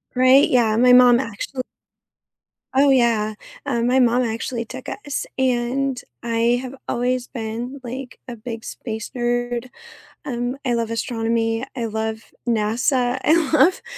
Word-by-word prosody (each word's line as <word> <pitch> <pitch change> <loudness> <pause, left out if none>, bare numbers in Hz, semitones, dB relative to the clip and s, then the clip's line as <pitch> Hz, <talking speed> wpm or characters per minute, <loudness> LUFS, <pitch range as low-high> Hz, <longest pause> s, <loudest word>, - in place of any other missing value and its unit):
Right? 255 +2 +6
Yeah. 230 -4 +3
My 250 +1 +6
mom 245 -1 +7
actual 255 +2 -4 1.1
Oh, 280 +1 +5
yeah, 230 -5 +3 0.3
uh, 240 -5 0
my 250 +2 +3
mom 245 0 +3
actually 230 +1 -3
took - - -9
us, 290 -9 -4
and 260 +1 0 0.2
I 235 +1 +1
have 260 +1 -7
always 250 +1 -1
been, 235 +3 -5
like, 255 +1 -7
a 245 - -6
big 225 0 -7
space 220 -2 -6
nerd. 240 0 -1 0.6
Um, 245 -2 -3
I 245 -2 +1
love 230 -1 -1
astronomy, 230 0 -1
I 235 - -2
love 220 0 -3 0.3
NASA, 245 +3 +1
I 310 - +5 0.2
love 335 +4 +4
240 Hz, 135 wpm, -21 LUFS, 230-255 Hz, 1.1 s, mom